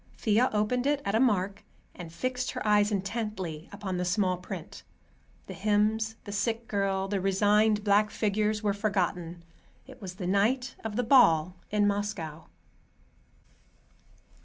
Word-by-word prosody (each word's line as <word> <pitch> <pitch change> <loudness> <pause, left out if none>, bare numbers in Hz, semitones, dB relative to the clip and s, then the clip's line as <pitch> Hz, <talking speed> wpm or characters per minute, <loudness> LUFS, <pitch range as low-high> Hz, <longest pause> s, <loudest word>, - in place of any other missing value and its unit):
Thea 225 +4 +2
opened 230 +5 0
it 290 -1 +2
at 200 - -1
a 220 - +3
mark, 200 -5 +1 0.3
and 170 -2 -9
fixed 250 +8 -2
her 255 -4 -4
eyes 210 0 +4
intently 195 -5 -4
upon 200 -2 -4
the 180 - -1
small 185 0 +1
print. 180 0 -8 0.6
The - - -8
hymns, 215 +2 +1
the 205 - -8
sick 225 +3 -2
girl, 195 -1 -1
the 195 -1 -1
resigned 210 +2 +3
black 205 +1 +3
figures 215 0 0
were 205 -1 +1
forgotten. 180 -4 -2 0.4
It - - -14
was 185 -2 -7
the 185 - -6
night 230 +7 +1
of 220 -2 -4
the 245 - +1
ball 180 - +5
in 210 0 +2
Moscow. 200 -6 -3
205 Hz, 145 wpm, -28 LUFS, 190-220 Hz, 0.6 s, ball